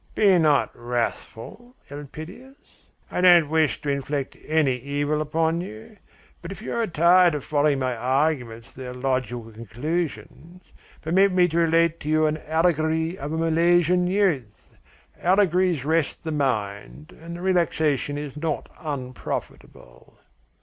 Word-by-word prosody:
"Be 195 -4 +4
not 150 -3 +3
wrathful, 120 - -5 0.2
Elpidias! 155 - -10 0.5
I - - -1
don't 175 -4 +6
wish 160 -2 +2
to 145 - -2
inflict 140 0 -3
any 155 -4 +2
evil 145 +3 -2
upon 160 +2 0
you. 110 - -10 0.5
But - - -8
if 195 - -8
you 220 - -6
are 230 -1 0
tired 175 0 +4
of 145 - -4
following 145 -1 +1
my 130 -2 -1
arguments 125 -2 -1
to - - -15
their 125 -1 -6
logical 125 -3 -3
conclusions, 155 - -5 0.4
permit 190 +5 +3
me 180 -1 +4
to 165 - -2
relate 165 0 +2
to 150 - -6
you 155 0 +3
an 155 0 0
allegory 160 0 +1
of 145 -3 -6
a 160 - -2
Milesian 175 +2 +2
youth. 170 - -1 0.5
Allegories 180 -5 +2
rest 160 -1 0
the 160 - -4
mind, 100 - -3
and 170 +1 -8
the 175 - -8
relaxation 160 -6 0
is 145 -2 -6
not 160 +2 -3
unprofitable." 130 - -7
155 Hz, 140 wpm, -24 LUFS, 135-175 Hz, 0.5 s, don't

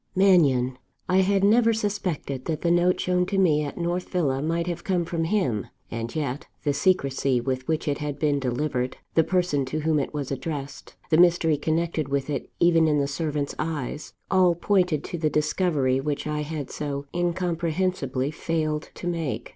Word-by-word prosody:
Mannion! 140 -10 +4 0.3
I 185 - +3
had 195 +1 +3
never 230 +3 +5
suspected 185 - -3
that 160 -2 -2
the 170 - +3
note 175 +1 +3
shown 180 0 +1
to 195 - -1
me 155 -6 +3
at 145 - -6
North 175 +1 -2
Villa 140 -7 0
might 165 +2 0
have 175 -1 -4
come 180 -3 0
from 165 -1 -2
him. 160 - 0 0.2
And 115 +3 -4
yet, 145 -3 -3 0.2
the 145 - +1
secrecy 140 -5 +1
with 130 +1 -3
which 160 0 -1
it 145 0 0
had 145 -2 -3
been 145 -2 +1
delivered; 130 0 -2 0.2
the 165 - +4
person 175 -6 +1
to 155 +4 -3
whom 155 0 +2
it 140 - -2
was 145 -3 -4
addressed; 140 0 -5 0.2
the 155 - +5
mystery 170 -2 +5
connected 160 0 -1
with 140 +1 -1
it 140 - -3
even 165 -2 +5
in 150 -1 +2
the 140 - +2
servant's 145 0 -2
eyes, 150 -2 -4 0.2
all 185 -2 +4
pointed 180 -4 +1
to 175 - -5
the 155 -1 +1
discovery 150 -3 +1
which 145 +1 -2
I 150 0 -2
had 150 -2 -5
so 140 -1 -4
incomprehensibly 170 -5 -1
failed 155 -1 -2
to - - -8
make. 160 -10 -2
155 Hz, 180 wpm, -25 LUFS, 140-175 Hz, 0.3 s, never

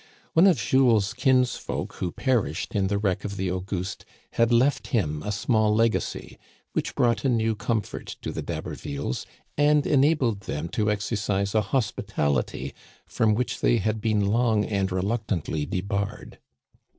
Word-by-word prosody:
One 170 +4 +6
of 180 -6 +4
Jules's 115 -6 +3
kinsfolk 125 0 0
who 90 - -2
perished 100 - -1
in 100 -2 +1
the 100 +1 0
wreck 100 -3 0
of 100 -1 -5
the 95 -2 -1
Auguste 95 0 -4 0.3
had 115 0 +2
left 130 +4 +3
him 75 - 0
a 105 - -3
small 105 0 +2
legacy, 115 0 0 0.3
which - - -2
brought 120 -2 +2
a 135 - +2
new 115 -2 +2
comfort 105 0 -3
to - - -3
the - - -4
D'Habervilles, 70 -2 -4 0.3
and 145 0 +4
enabled 135 -6 +3
them 85 -4 -4
to 105 +2 0
exercise 100 -1 -1
a 110 - +3
hos 105 +3 0
pitality 70 -1 -2 0.3
from 110 -1 +1
which 125 +2 -2
they 120 - +4
had 110 +1 -1
been 105 -2 +1
long 110 0 +2
and 100 -2 -1
reluctantly 95 -6 -1
debarred. 100 +3 -3
105 Hz, 150 wpm, -26 LUFS, 95-120 Hz, 0.3 s, One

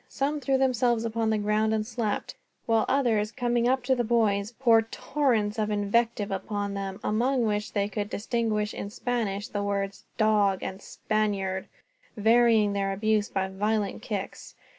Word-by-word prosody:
Some 290 +2 -1
threw 270 0 +1
themselves 245 -3 +2
upon 225 0 -1
the 220 - +2
ground 215 +1 +1
and 215 -1 -1
slept; 225 -3 -3 0.3
while 225 -1 +2
others, 230 -6 +2
coming 240 -1 0
up 260 0 +1
to 260 +1 +2
the 245 -2 0
boys, 215 -3 +1
poured 225 -3 +3
torrents 230 -7 0
of 215 0 0
invective 210 0 0
upon 200 +1 -3
them, 195 0 -4
among 245 +3 +1
which 210 0 -2
they 200 -1 +1
could 205 0 -4
distinguish 220 -1 -1
in 200 - -5
Spanish 215 -3 -2
the 205 - -3
words 200 -1 -2
"dog" 210 -3 +2
and 190 +1 -5
"Spaniard," 200 -4 -2 0.5
varying 225 -1 +4
their 195 -1 0
abuse 215 +1 +1
by 190 0 -1
violent 210 +2 -1
kicks. 200 -3 -6
215 Hz, 160 wpm, -27 LUFS, 205-235 Hz, 0.5 s, varying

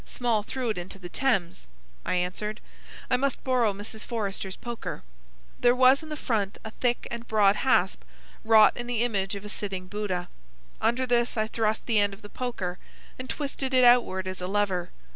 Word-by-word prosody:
"Small 235 -4 0
threw 250 +3 -3
it 210 - -3
into 180 +2 -7
the 180 -2 -9
Thames," 180 - 0 0.4
I - - +1
answered. 185 +4 -2 0.5
"I - - +5
must 275 0 -1
borrow 250 -4 +2
Mrs. 205 +2 -7
Forrester's 200 -4 -3
poker." 240 -2 -6 0.6
There 245 0 +4
was 260 +2 +6
in 315 - -10
the 305 - -4
front 210 -8 -1
a 220 - -5
thick 245 +1 -1
and 235 0 -6
broad 210 -2 +4
hasp, - - +2 0.4
wrought 220 -1 +6
in 240 0 -5
the 240 -1 0
image 200 -4 -1
of 200 +1 -7
a - - -5
sitting 195 -3 -4
Buddha. 185 -2 -3 0.5
Under 255 +2 +2
this 240 -1 +1
I 215 - +2
thrust 220 -1 -1
the 225 -3 +3
end 205 -1 +1
of 200 - -22
the 205 - -9
poker 200 -9 -4 0.4
and 255 0 -6
twisted 275 -2 -3
it 255 - +6
outward 240 -6 +5
as 185 0 -5
a 180 - -2
lever. 190 -3 0
215 Hz, 190 wpm, -27 LUFS, 195-245 Hz, 0.6 s, was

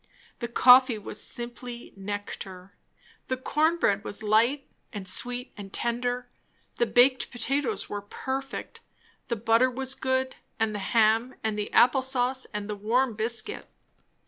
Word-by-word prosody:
The 235 - -3
coffee 250 0 +6
was 210 0 -6
simply 240 0 -7
nectar. 195 -1 -7 0.5
The 260 - -1
corn 310 +6 +1
bread 200 -10 +1
was 205 - -4
light 235 +7 +2 0.2
and 200 -3 -7
sweet 245 +6 +1
and 195 -2 -9
tender; 245 +2 -1 0.5
the 240 - +2
baked 250 +4 +4
potatoes 245 -3 -1
were 205 - -5
perfect; 265 +6 -5 0.5
the 235 - -1
butter 230 +3 +3
was 265 +1 -1
good, 260 0 -1 0.2
and 220 -1 +1
the 205 - -3
ham, 225 +4 +2
and 220 -1 -1
the 210 -1 -4
apple 255 +2 +5
sauce, 260 0 +1
and 210 -1 -6
the 210 - -4
warm 230 +5 +1
biscuit. 230 - -3
240 Hz, 145 wpm, -27 LUFS, 210-260 Hz, 0.5 s, coffee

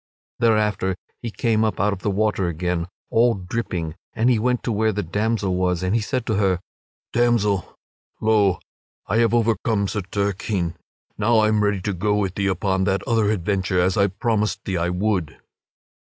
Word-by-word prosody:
Thereafter 105 -4 +2 0.3
he 120 - -4
came 110 0 +1
up 110 - -1
out 105 +1 +2
of 95 - -6
the 105 - -1
water 105 -2 +1
again, 85 +1 -2 0.2
all 115 +1 +4
dripping, 90 -4 -3 0.2
and 120 +2 +2
he 115 - +2
went 125 +2 0
to 120 - -1
where 110 +1 +2
the 105 0 -2
damsel 105 +1 0
was 90 -1 0
and 90 +2 0
he 115 - +2
said 125 +2 -2
to 110 -4 0
her; 95 -3 +2 0.5
"Damsel, 115 -5 +1 0.4
lo, 105 -4 +3 0.5
I 105 - 0
have 115 0 +3
overcome 110 -2 +1
Sir 105 +1 -2
Turquine; 100 -2 -2 0.5
now 115 +2 +3
I 110 0 +4
am 105 -1 +2
ready 105 -2 +1
to 100 - -2
go 105 +3 0
with 100 -3 0
thee 100 0 -1
upon 95 0 0
that 95 -1 0
other 115 -3 +2
adventure, 95 -2 0
as 90 +1 +2
I 100 -1 +4
promised 105 +2 -1
thee 95 - -2
I 85 +1 0
would." 90 -2 -1
105 Hz, 180 wpm, -22 LUFS, 95-110 Hz, 0.5 s, all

